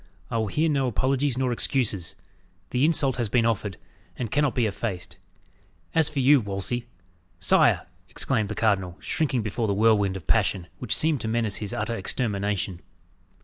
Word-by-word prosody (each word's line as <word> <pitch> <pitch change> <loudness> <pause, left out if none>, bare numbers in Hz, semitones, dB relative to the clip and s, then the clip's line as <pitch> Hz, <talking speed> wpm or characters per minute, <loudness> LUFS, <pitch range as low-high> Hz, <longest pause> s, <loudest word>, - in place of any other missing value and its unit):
"I 115 - 0
will 110 - 0
hear 155 +11 +1
no 140 -4 +1
apologies 130 +2 0
nor 130 -1 +1
excuses. 115 - 0 0.6
The 125 +3 +3
insult 145 -5 +2
has 120 -4 -1
been 115 +1 +3
offered, 105 -5 -1 0.4
and 115 -4 -4
cannot 145 -5 +1
be 120 - +2
effaced. 100 -3 -4 0.8
As 160 -2 +3
for 150 - -9
you, 135 +2 +6
Wolsey 100 +4 -3 0.3
" 85 +3 -38
"Sire!" - - +5 0.2
exclaimed 110 -2 -1
the 105 - -4
cardinal, 95 -5 +1
shrinking 140 -8 0
before 110 +2 -1
the 100 - +1
whirlwind 100 -3 +3
of 90 - -11
passion, 90 -3 +1
which 125 - -1
seemed 155 -4 +1
to - - -3
menace 110 -2 0
his 105 -2 -4
utter 110 +2 -2
extermination. 100 -4 -2
115 Hz, 170 wpm, -26 LUFS, 100-130 Hz, 0.8 s, you